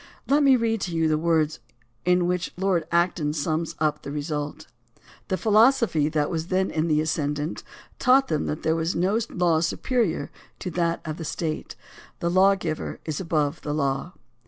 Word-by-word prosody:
Let 285 +2 +3
me 275 -2 +6
read 225 -3 0
to 175 -2 -3
you 165 -1 +2
the 155 -1 +1
words 160 -2 +1 0.5
in 180 0 +3
which 180 0 -1
Lord 180 -4 0
Acton 170 -3 +1
sums 155 +2 -2
up 150 -1 0
the - - -7
result: 150 0 -4 0.6
The 185 - 0
philosophy 215 - +3
that 150 -2 0
was 165 -1 -2
then 190 0 0
in 160 +1 0
the 155 -2 +2
ascendant 150 0 -2 0.4
taught 265 +1 +4
them 155 -2 -1
that 150 - -4
there 160 +1 +1
is 165 +2 -1
no 190 +6 +2
law 175 -3 +2
superior 185 - -1 0.3
to 180 - -5
that 170 0 0
of 155 0 -4
the 165 - -6
State 155 0 -4 0.2
— - - -21
the 170 - 0
lawgiver 185 -4 +1
is 155 -3 -3
above 155 -3 -1
the 145 0 -3
law. 140 +4 -1
165 Hz, 180 wpm, -25 LUFS, 155-185 Hz, 0.6 s, me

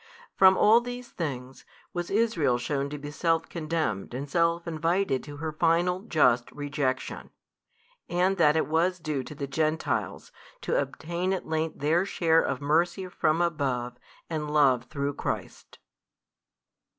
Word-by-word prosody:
From 190 0 +6
|333 - - -3
all 225 +3 +6
these 245 0 -7
things, 130 -5 -6 0.3
was 175 -1 -3
Israel 195 - +2
shewn 140 +3 -2
to 150 - -5
be 145 +1 -7
self 165 +1 0
condemned 155 - -2
and 140 +3 -4
self 170 +3 +1
invited 165 -2 0
to 145 -1 -9
her 160 +1 -3
final 170 +3 +2
just 125 - +2
rejection, 145 -3 -3 0.8
and 185 +2 +1
that 150 -3 +4
it 160 - +2
was 170 +4 +1
due 155 -5 -3
to 150 - -9
the 140 -1 -4
Gentiles 155 +3 -2 0.3
to - - +1
obtain 170 +7 -3
at 190 - -3
length 160 0 -2
their 160 +5 +3
share 165 -4 +2
of 135 - -2
mercy 170 +5 +1
from 165 -1 +1
above 135 -7 -1 0.3
and 155 -2 -3
love 135 -5 +3
through 140 +1 -3
Christ. - - -5
160 Hz, 150 wpm, -27 LUFS, 140-175 Hz, 0.8 s, From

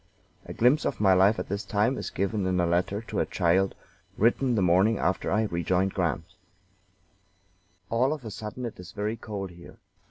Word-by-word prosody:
A - - -7
glimpse 125 +6 +3
of - - -2
my 95 -2 +5
life 95 +4 +4
at - - -4
this 100 +2 -3
time 105 +5 +1
is - - -4
given 100 0 -1
in 90 -1 +1
a 90 - +3
letter 90 +5 0
to - - -4
a - - +2
child, 95 +2 +1 0.4
written 120 +3 +2
the 105 - +1
morning 95 +5 +4
after 95 - -1
I 105 +3 +2
rejoined 95 0 0
Grant: 80 -3 -1 1.7
"All 125 +4 +2
of 150 -5 -5
a 110 - -5
sudden 110 +5 -6
it 115 - -7
is 90 -1 -10
very 105 +2 -2
cold 100 -4 -6
here. 85 0 -14
100 Hz, 190 wpm, -27 LUFS, 90-110 Hz, 1.7 s, my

